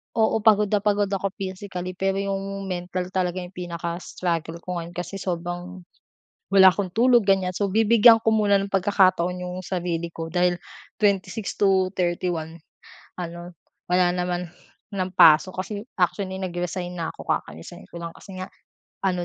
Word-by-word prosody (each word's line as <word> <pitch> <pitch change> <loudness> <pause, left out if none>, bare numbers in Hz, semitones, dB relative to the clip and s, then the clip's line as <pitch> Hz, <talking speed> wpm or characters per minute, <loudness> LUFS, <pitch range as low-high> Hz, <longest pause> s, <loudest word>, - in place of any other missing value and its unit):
oo. 225 0 +2
pagod 210 -2 +4
na 210 - +3
pagod 205 0 +1
ako 195 -1 -2
physically 185 -1 -5
pero 190 +1 -1
yung 195 0 -3
mental 180 -1 -4
talaga 185 -1 -1
yung 175 - -10
pinaka-struggle 170 -1 -4
ko 180 -1 -3
ngayon 170 +1 -8
kasi 180 +2 -5
sobrang, 175 0 -5 0.7
wala 190 -1 +9
akong 185 0 0
tulog 240 +1 +4
ganyan 190 -2 +1
so 200 -2 -1
bibigyan 225 +1 +6
ko 225 - -1
muna 210 -2 +3
ng 200 - -3
pagkakataon 185 -2 +2
'yong 180 +1 -6
sarili 170 -2 -3
ko 165 0 -6
dahil 175 +1 +1 0.4
26 200 0 0
to 190 -2 +3
31 175 -2 -2 0.6
ano, 175 0 -6 0.4
wala 180 0 +3
naman 180 0 -2 0.5
ng 185 -1 -2
pasok 165 +3 +6
kasi 205 +1 -6 0.2
actually 190 +1 0
nag-resign 180 0 -4
na 165 -2 -3
ako, - - -12
kaka-resign 80 - -4
ko 170 - -8
lang 170 - -4
kasi 190 -2 -11
nga, 185 - -5 0.6
ano 180 -2 0
185 Hz, 155 wpm, -24 LUFS, 175-195 Hz, 0.7 s, wala